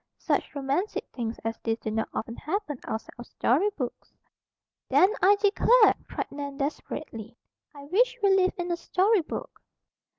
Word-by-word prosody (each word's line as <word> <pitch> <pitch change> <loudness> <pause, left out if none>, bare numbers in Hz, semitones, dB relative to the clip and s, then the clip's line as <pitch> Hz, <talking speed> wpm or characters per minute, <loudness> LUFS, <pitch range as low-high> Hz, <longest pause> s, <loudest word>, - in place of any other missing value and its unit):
"Such - - -1
romantic 285 +9 -1
things 230 -2 -3
as 225 0 -3
this 225 -1 -1
do 220 - -4
not 220 +1 -1
often 230 +1 -4
happen 310 - -3
outside 220 - -5
of 240 - -8
story 320 - +2
books." 250 -4 -5 0.8
"Then, 385 +3 +5
I 400 +2 +6
declare!" 425 +3 +5 0.2
cried - - -4
Nan 280 -1 -6
desperately, 235 -5 -5 0.4
"I 285 - -10
wish 485 +11 +2
we 390 -1 +5
lived 375 +1 +2
in 355 0 -2
a 340 - 0
story 385 +4 +2
book!" 310 - -7
300 Hz, 160 wpm, -27 LUFS, 240-395 Hz, 0.8 s, I